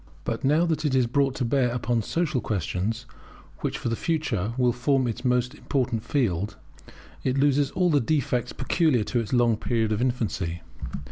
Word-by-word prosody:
But 115 Hz, -, -3 dB
now 150 Hz, +5 st, +4 dB
that 160 Hz, -2 st, -1 dB
it 145 Hz, -4 st, +1 dB
is 130 Hz, -2 st, +4 dB
brought 135 Hz, +2 st, +1 dB
to 130 Hz, -, -1 dB
bear 125 Hz, +1 st, +2 dB
upon 120 Hz, -1 st, 0 dB
social 155 Hz, +2 st, -1 dB
questions, 105 Hz, +4 st, -2 dB, 0.5 s
which -, -, -2 dB
for -, -, -4 dB
the 115 Hz, -, 0 dB
future 120 Hz, -, -1 dB
will 125 Hz, -2 st, +3 dB
form 130 Hz, +2 st, +1 dB
its 115 Hz, 0 st, -4 dB
most 125 Hz, 0 st, +1 dB
important 125 Hz, -6 st, -1 dB
field, 105 Hz, -, 0 dB, 0.7 s
it 130 Hz, +1 st, 0 dB
loses 140 Hz, 0 st, +3 dB
all 180 Hz, +1 st, +1 dB
the 145 Hz, -2 st, +4 dB
defects 125 Hz, -2 st, 0 dB
peculiar 135 Hz, -3 st, +2 dB
to 120 Hz, -, -1 dB
its 115 Hz, -, -4 dB
long 120 Hz, -3 st, +3 dB
period 110 Hz, -1 st, 0 dB
of 110 Hz, +1 st, 0 dB
infancy. 100 Hz, -9 st, -1 dB
125 Hz, 180 wpm, -26 LUFS, 115-140 Hz, 0.7 s, now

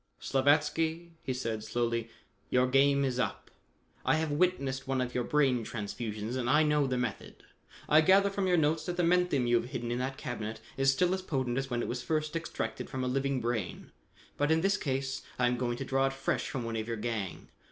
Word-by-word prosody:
"Slavatsky," 160 Hz, +4 st, +1 dB
he -, -, -3 dB
said 115 Hz, -4 st, -3 dB
slowly, 115 Hz, 0 st, -1 dB, 0.4 s
"your 125 Hz, 0 st, +3 dB
game 140 Hz, +2 st, +4 dB
is 130 Hz, -1 st, -1 dB
up. -, -, -2 dB, 0.5 s
I -, -, +3 dB
have 160 Hz, -1 st, 0 dB
witnessed 140 Hz, -5 st, 0 dB
one 135 Hz, -1 st, 0 dB
of 125 Hz, -1 st, -2 dB
your 125 Hz, -, 0 dB
brain 135 Hz, -4 st, +2 dB
transfusions 110 Hz, +1 st, -4 dB
and 120 Hz, -2 st, -1 dB
I 150 Hz, +4 st, +5 dB
know 150 Hz, -2 st, +2 dB
the 130 Hz, -1 st, -1 dB
method. 120 Hz, -5 st, -4 dB, 0.4 s
I 155 Hz, +1 st, +6 dB
gather 195 Hz, +4 st, +5 dB
from 195 Hz, -1 st, -1 dB
your 180 Hz, -1 st, +4 dB
notes 155 Hz, 0 st, +2 dB
that 175 Hz, -, -3 dB
the 175 Hz, -, +2 dB
menthium 175 Hz, -6 st, +3 dB
you 120 Hz, 0 st, +4 dB
have 120 Hz, -, -3 dB
hidden 120 Hz, -3 st, -4 dB
in 120 Hz, -, -1 dB
that 135 Hz, +1 st, -3 dB
cabinet 110 Hz, -3 st, -5 dB, 0.2 s
is 135 Hz, 0 st, +4 dB
still 180 Hz, +6 st, +2 dB
as 190 Hz, -, -2 dB
potent 130 Hz, -7 st, -1 dB
as 135 Hz, 0 st, -4 dB
when 120 Hz, -1 st, -1 dB
it -, -, -3 dB
was 125 Hz, +1 st, -3 dB
first 155 Hz, +2 st, -1 dB
extracted 140 Hz, -9 st, -4 dB
from 130 Hz, -1 st, -3 dB
a -, -, -1 dB
living 135 Hz, 0 st, 0 dB
brain, 115 Hz, -5 st, -3 dB, 0.5 s
but 145 Hz, +1 st, +1 dB
in 160 Hz, 0 st, +3 dB
this 195 Hz, +3 st, +3 dB
case 135 Hz, -6 st, -2 dB, 0.2 s
I 125 Hz, -, +2 dB
am 125 Hz, 0 st, +2 dB
going 120 Hz, -1 st, -1 dB
to 135 Hz, -, -4 dB
draw 135 Hz, 0 st, +2 dB
it 135 Hz, -, -3 dB
fresh 135 Hz, -, -1 dB
from 130 Hz, -, -3 dB
one 115 Hz, -1 st, -3 dB
of 110 Hz, 0 st, -3 dB
your 115 Hz, -1 st, -2 dB
gang. 105 Hz, -4 st, -4 dB
135 Hz, 220 wpm, -31 LUFS, 120-150 Hz, 0.5 s, I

